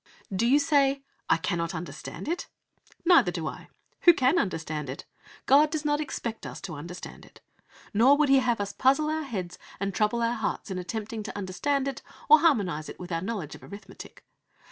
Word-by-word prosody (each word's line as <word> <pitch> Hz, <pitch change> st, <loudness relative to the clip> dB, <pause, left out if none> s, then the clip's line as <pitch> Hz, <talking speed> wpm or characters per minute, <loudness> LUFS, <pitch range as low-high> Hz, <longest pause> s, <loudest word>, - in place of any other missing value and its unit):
Do 225 Hz, +5 st, +2 dB
you 270 Hz, +4 st, +5 dB
say, 280 Hz, -3 st, +2 dB, 0.3 s
"I -, -, +5 dB
cannot 170 Hz, +1 st, -2 dB
understand 175 Hz, -, -7 dB
it"? 340 Hz, +3 st, -2 dB, 0.6 s
Neither 335 Hz, -, +6 dB
do 170 Hz, -3 st, -4 dB
I. -, -, -7 dB, 0.4 s
Who 345 Hz, -2 st, +9 dB
can 270 Hz, +6 st, +3 dB
understand 155 Hz, -6 st, -3 dB
it? 135 Hz, -, -7 dB, 0.4 s
God 290 Hz, +3 st, +6 dB
does 305 Hz, -1 st, -3 dB
not 295 Hz, 0 st, +1 dB
expect 235 Hz, -6 st, -5 dB
us -, -, -8 dB
to 195 Hz, -4 st, -6 dB
understand 170 Hz, +5 st, -8 dB
it. -, -, -17 dB, 0.5 s
Nor 250 Hz, +7 st, +6 dB
would 300 Hz, -2 st, +3 dB
He 270 Hz, 0 st, +6 dB
have 245 Hz, -3 st, +1 dB
us 200 Hz, 0 st, -3 dB
puzzle 290 Hz, +4 st, +2 dB
our 315 Hz, 0 st, -1 dB
heads 190 Hz, -, -5 dB, 0.2 s
and 195 Hz, 0 st, -2 dB
trouble 220 Hz, +3 st, +1 dB
our 230 Hz, +1 st, +1 dB
hearts 220 Hz, -2 st, -3 dB
in 185 Hz, -, -3 dB
attempting 220 Hz, +4 st, -5 dB
to 205 Hz, -, -7 dB
understand 265 Hz, +9 st, -1 dB
it 275 Hz, -1 st, -4 dB, 0.3 s
or 310 Hz, +1 st, +9 dB
harmonise 200 Hz, -, +1 dB
it -, -, -10 dB
with 180 Hz, 0 st, -8 dB
our 165 Hz, 0 st, -1 dB
knowledge 190 Hz, -6 st, -4 dB
of -, -, -11 dB
arithmetic. 200 Hz, +1 st, -12 dB
225 Hz, 190 wpm, -27 LUFS, 180-280 Hz, 0.6 s, Who